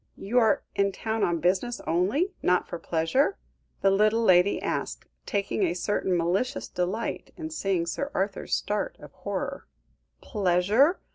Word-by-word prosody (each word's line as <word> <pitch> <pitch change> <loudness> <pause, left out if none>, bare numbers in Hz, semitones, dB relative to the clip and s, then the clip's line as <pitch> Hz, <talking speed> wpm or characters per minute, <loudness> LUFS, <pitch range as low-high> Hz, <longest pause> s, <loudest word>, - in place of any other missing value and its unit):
"You 230 +6 +1
are 220 -3 +3
in 200 0 +2
town 220 +2 -2
on 170 -1 +1
business 190 +8 0
only, 205 - +1
not 180 0 +2
for 170 - -6
pleasure?" 170 - +1 0.4
the 195 - +4
little 215 +3 +3
lady 185 -1 +4
asked, - - -3 0.2
taking 200 +1 -1
a 175 -3 +1
certain 185 -1 0
malicious 190 +11 0
delight 185 +6 -3
in 320 -2 -6
seeing 195 - 0
Sir 280 +11 -3
Arthur's 195 0 -1
start 210 0 -2
of - - -12
horror. - - -4 0.5
"Pleasure? 205 - +2
200 Hz, 145 wpm, -27 LUFS, 180-230 Hz, 0.5 s, the